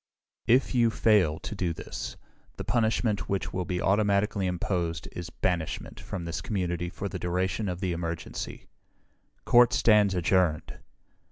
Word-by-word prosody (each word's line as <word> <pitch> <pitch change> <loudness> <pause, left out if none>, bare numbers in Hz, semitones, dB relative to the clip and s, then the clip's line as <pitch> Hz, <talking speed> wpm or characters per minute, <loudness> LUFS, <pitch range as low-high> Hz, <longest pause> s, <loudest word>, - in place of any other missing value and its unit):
"If 125 +4 +4
you 120 -2 +4
fail 105 -9 +3
to - - -6
do 90 -4 -1
this, - - -6 0.4
the - - -4
punishment 110 -2 0
which 100 -1 -2
will 90 -1 -2
be 90 -1 -2
automatically 100 0 +2
imposed 90 -1 -2
is 90 0 -6
banishment 90 -2 -2
from 90 -3 -6
this 85 +1 -3
community 90 -4 -2
for 100 - -5
the 95 -1 -5
duration 95 +4 -1
of 90 0 -4
the 95 -2 0
emergency. 85 -1 -5 0.8
"Court 120 0 +6
stands 105 -4 +4
adjourned!" 90 -3 +1
95 Hz, 145 wpm, -28 LUFS, 85-105 Hz, 0.8 s, Court